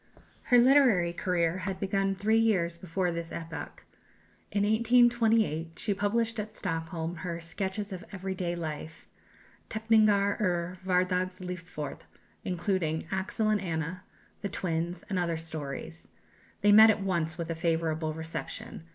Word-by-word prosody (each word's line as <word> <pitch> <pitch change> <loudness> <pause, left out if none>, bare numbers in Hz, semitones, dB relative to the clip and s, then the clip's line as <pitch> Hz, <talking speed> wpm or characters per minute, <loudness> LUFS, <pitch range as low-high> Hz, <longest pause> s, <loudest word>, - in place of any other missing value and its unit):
Her 245 - +5
literary 240 -9 +5
career 175 -1 0
had 190 0 -4
begun 195 0 0
three 220 +3 +2
years 175 -7 +1
before 180 0 -1
this 170 0 -5
epoch. 165 0 -7 0.7
In 200 0 +1
1828 225 -6 +3
she 210 - 0
published 225 +3 0
at 215 +1 -5
Stockholm 165 -1 -3
her 170 0 -4
"Sketches 190 +4 -4
of 180 -1 -7
Every 190 -1 -4
day 180 -2 -2
Life" 155 -1 -6 0.6
(Teckningar 215 -2 +3
ur 180 -2 -1
Hvardags 185 0 +1
lifort), 180 -4 -6 0.4
including, 175 -3 -1
"Axel 195 +3 -1
and 210 -2 +2
Anna," 165 0 -3 0.4
"The 200 - -2
Twins," 170 -1 -2
and 190 -3 -1
other 170 -2 0
stories. 150 - -7 0.5
They 205 - +5
met 220 +2 +9
at 210 -2 +2
once 170 -3 -1
with 170 -1 -3
a - - +1
favourable 160 -1 -1
reception. 160 0 -6
185 Hz, 135 wpm, -29 LUFS, 165-205 Hz, 0.7 s, met